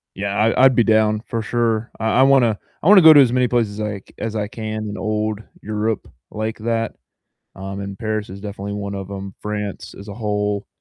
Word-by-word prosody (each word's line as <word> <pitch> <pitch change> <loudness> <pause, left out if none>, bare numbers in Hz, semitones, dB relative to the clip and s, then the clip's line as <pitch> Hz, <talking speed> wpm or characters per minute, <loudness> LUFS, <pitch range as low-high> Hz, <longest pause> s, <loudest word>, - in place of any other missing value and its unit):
Yeah, 100 +1 -3
I 115 +4 +3
I'd 130 - +5
be 120 - +5
down 110 -1 +3
for 115 -2 -2
sure. 115 0 -1
I 110 +3 +2
I - - +7
wanna 125 -6 +4 0.3
I - - 0
wanna 200 -2 +9
go 160 -1 +10
to 145 - +8
as 125 -2 +3
many 125 -1 +3
places 110 -4 0
like, 105 -2 -5
as 110 -1 -4
I 105 -1 -1
can 110 -1 -5
in 100 - -6
old 110 0 -2 0.2
Europe 110 +1 -2 0.2
like 110 +1 -3
that, 115 0 -2 0.6
um, 95 +1 -6
and 100 0 -6
Paris 110 -3 -3
is 100 +1 -9
definitely 100 -1 -6
one 100 -1 -4
of 95 0 -6
'em. 95 -1 -7
France 105 -1 -5
as 100 +1 -10
a 100 - -6
whole, 105 -2 -2
110 Hz, 210 wpm, -20 LUFS, 100-115 Hz, 0.6 s, go